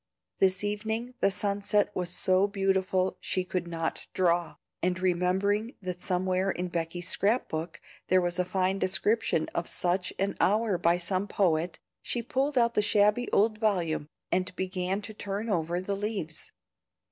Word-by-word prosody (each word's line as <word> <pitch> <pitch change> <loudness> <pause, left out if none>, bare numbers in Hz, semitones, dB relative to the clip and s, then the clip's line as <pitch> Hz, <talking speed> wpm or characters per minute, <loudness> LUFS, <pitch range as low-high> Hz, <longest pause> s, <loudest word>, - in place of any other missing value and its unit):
This 190 0 +3
evening 220 +4 -2
the - - +4
sunset 205 +1 0
was 180 -1 -1
so 185 +2 +2
beautiful 190 -2 +1
she 185 - -1
could 180 -1 -3
not 165 -1 -3
draw, 175 -2 +2 0.3
and 180 0 0
remembering 190 +5 +1
that 180 -2 -5
somewhere 185 0 +1
in 180 -1 -2
Becky's 170 +1 -3
scrap 210 +6 +2
book 160 +2 -4 0.3
there 185 - +5
was 175 0 -1
a - - +4
fine 190 +1 0
description 185 0 +1
of 170 - -2
such 180 +1 0
an 195 +1 -1
hour 210 -2 +2
by 170 0 +3
some 185 +3 0
poet, 170 -4 +1 0.2
she 240 - -2
pulled 270 +4 0
out 235 -1 +4
the 210 - +3
shabby 210 +3 +3
old 215 +1 +2
volume, 175 -9 0 0.2
and 185 +1 0
began 185 +2 -2
to 215 - -7
turn 205 +2 -4
over 170 -1 0
the 195 +2 -2
leaves. 200 -6 -4
185 Hz, 160 wpm, -29 LUFS, 180-205 Hz, 0.3 s, there